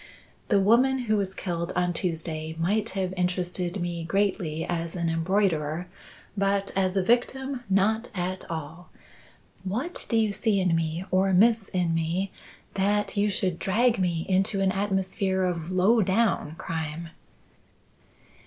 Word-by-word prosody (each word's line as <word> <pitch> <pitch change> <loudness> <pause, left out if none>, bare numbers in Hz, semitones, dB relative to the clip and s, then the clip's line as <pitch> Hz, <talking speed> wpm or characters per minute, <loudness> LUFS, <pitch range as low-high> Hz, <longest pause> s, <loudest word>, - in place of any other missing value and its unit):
The 205 - +4
woman 240 +7 +4
who 215 -1 +2
was 195 -2 -1
killed 170 -2 -3
on 180 0 +1
Tuesday 160 -2 -3
might 205 +7 0
have 185 -1 -1
interested 180 0 -1
me 175 -1 -3
greatly 180 -3 0
as 170 -1 -3
an 170 -2 0
embroiderer, 165 -2 0 0.5
but 195 0 0
as 190 0 +1
a 190 - +3
victim, 250 +4 0
not 215 +5 +2
at 185 +1 -2
all. 165 +2 -6 0.7
What 240 - -3
do 230 - +2
you 215 -2 +2
see 205 0 +1
in 180 -3 +2
me, 165 +2 -2
or 190 +1 +3
miss 220 +2 +4
in 180 -3 0
me, 165 +4 -1 0.4
that 205 +2 0
you 205 0 +2
should 185 -3 -1
drag 230 +5 +2
me 170 -3 0
into 195 +1 +1
an 195 -1 +2
atmosphere 190 -1 0
of 170 -2 -2
low 190 +5 +4
down 190 -5 +1
crime?" 160 0 -4
185 Hz, 145 wpm, -26 LUFS, 170-205 Hz, 0.7 s, The